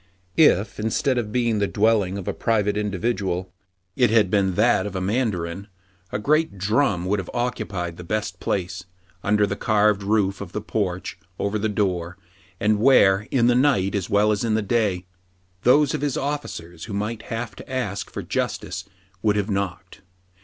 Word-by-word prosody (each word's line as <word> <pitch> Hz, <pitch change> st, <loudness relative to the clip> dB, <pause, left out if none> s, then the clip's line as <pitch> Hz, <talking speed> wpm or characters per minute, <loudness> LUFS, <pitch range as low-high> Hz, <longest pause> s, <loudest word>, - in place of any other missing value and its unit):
If, 110 Hz, -, +4 dB
instead 120 Hz, +4 st, +1 dB
of 105 Hz, -3 st, -4 dB
being 115 Hz, -2 st, +1 dB
the 100 Hz, -, +1 dB
dwelling 100 Hz, -3 st, +2 dB
of 95 Hz, -, -7 dB
a -, -, 0 dB
private 105 Hz, -3 st, +1 dB
individual, 100 Hz, -3 st, -2 dB, 0.4 s
it 125 Hz, -3 st, +4 dB
had 105 Hz, -4 st, +3 dB
been 95 Hz, -3 st, +2 dB
that 105 Hz, -2 st, +3 dB
of 100 Hz, -, -7 dB
a -, -, -1 dB
mandarin, 95 Hz, -3 st, -1 dB, 0.4 s
a -, -, -1 dB
great 150 Hz, +1 st, +1 dB
drum 100 Hz, -2 st, +1 dB
would 100 Hz, +2 st, +1 dB
have 95 Hz, -, -6 dB
occupied 100 Hz, -8 st, -3 dB
the 90 Hz, -, -8 dB
best 95 Hz, -1 st, -3 dB
place, 90 Hz, -1 st, -2 dB, 0.4 s
under 105 Hz, 0 st, +3 dB
the 100 Hz, 0 st, -3 dB
carved 105 Hz, -1 st, +2 dB
roof 100 Hz, -1 st, +1 dB
of 90 Hz, -3 st, -8 dB
the -, -, -1 dB
porch 95 Hz, -4 st, -3 dB, 0.2 s
over 100 Hz, +1 st, -1 dB
the 110 Hz, +1 st, 0 dB
door, 90 Hz, -4 st, -1 dB, 0.4 s
and 105 Hz, -1 st, +2 dB
where, 105 Hz, -5 st, +5 dB
in 120 Hz, -3 st, +2 dB
the 120 Hz, -, +5 dB
night 120 Hz, -7 st, +2 dB
as 100 Hz, -3 st, -2 dB
well 105 Hz, +1 st, +3 dB
as 105 Hz, +1 st, 0 dB
in 110 Hz, -2 st, +1 dB
the 110 Hz, -, 0 dB
day, 100 Hz, -4 st, 0 dB, 0.6 s
those 145 Hz, +3 st, +4 dB
of -, -, -2 dB
his 145 Hz, -3 st, -1 dB
officers 110 Hz, -, -4 dB
who 110 Hz, -, -7 dB
might 105 Hz, +2 st, -3 dB
have 115 Hz, 0 st, -4 dB
to -, -, -11 dB
ask 105 Hz, -6 st, -3 dB
for -, -, -6 dB
justice -, -, -3 dB, 0.4 s
would 105 Hz, +1 st, +2 dB
have 105 Hz, +1 st, -1 dB
knocked. 100 Hz, -1 st, -4 dB
105 Hz, 180 wpm, -23 LUFS, 95-115 Hz, 0.6 s, where